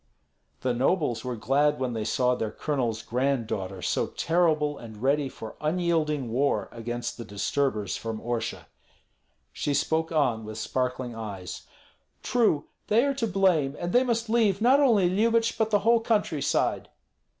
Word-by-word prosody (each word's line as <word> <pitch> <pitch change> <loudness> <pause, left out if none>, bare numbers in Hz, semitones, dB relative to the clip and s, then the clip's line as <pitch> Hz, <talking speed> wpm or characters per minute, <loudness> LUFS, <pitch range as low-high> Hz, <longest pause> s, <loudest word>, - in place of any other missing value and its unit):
The 125 -1 0
nobles 130 0 +1
were 125 -1 -3
glad 145 +5 +2
when 130 -2 -1
they 110 -2 -3
saw 125 +1 +2
their 110 -3 -2
colonel's 120 -5 -2
granddaughter 115 -7 -2
so - - 0
terrible 155 -3 +1
and 110 -3 -10
ready 140 +3 +1
for 110 -3 -9
unyielding 155 -5 0
war 140 +4 +1
against 120 +1 -5
the - - -4
disturbers 105 0 -1
from 115 -1 -5
Orsha. 120 -1 -3 0.9
She 145 - -1
spoke 160 +3 0
on 125 -8 +1
with 110 0 -7
sparkling 125 +1 -2
eyes: 100 -5 -7 0.6
"True, 215 -12 +2 0.2
they 230 +5 +4
are 280 - +1
to 245 -4 -1
blame; 180 -8 +2
and 175 +1 -3
they 245 - +5
must 230 -2 -1
leave 220 -4 +2
not 255 +5 +5
only 225 -10 +4
Lyubich, 230 +5 +2
but 220 -1 0
the 205 -2 +2
whole 235 0 +5
country 210 - 0
side." - - 0
145 Hz, 155 wpm, -27 LUFS, 120-190 Hz, 0.9 s, they